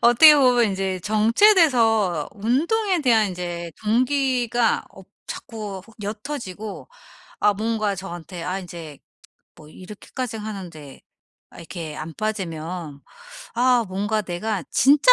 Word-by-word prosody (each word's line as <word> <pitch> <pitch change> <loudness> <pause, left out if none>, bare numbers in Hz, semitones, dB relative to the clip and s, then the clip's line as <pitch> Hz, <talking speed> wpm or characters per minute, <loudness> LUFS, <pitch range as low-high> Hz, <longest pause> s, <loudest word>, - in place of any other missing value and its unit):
어떻게 240 +6 +8
보면 250 -3 +4
인제 190 -1 -2
정체돼서 225 - +3
운동에 335 - +1
대한 225 -7 +3
인제 175 -2 -5
동기가 245 0 +1
없 190 -1 -15 0.2
자꾸 210 -4 -7 0.2
옅어지고 210 -2 -6 0.5
아 210 - +4
뭔가 215 0 -1
저한테 175 -2 -8
아 180 +3 -2
인제 170 -6 -9 0.6
뭐 155 - -15
이렇게까지 215 - -7
하는데 180 -10 -8 0.5
아 - - -17
이렇게 165 -2 -7
안 160 +1 -6
빠지면 170 -7 -4 0.5
아 245 0 +3
뭔가 205 +3 -1
내가 190 +1 -3
진짜 290 - +6
210 Hz, 240 characters per minute, -23 LUFS, 180-240 Hz, 0.6 s, 어떻게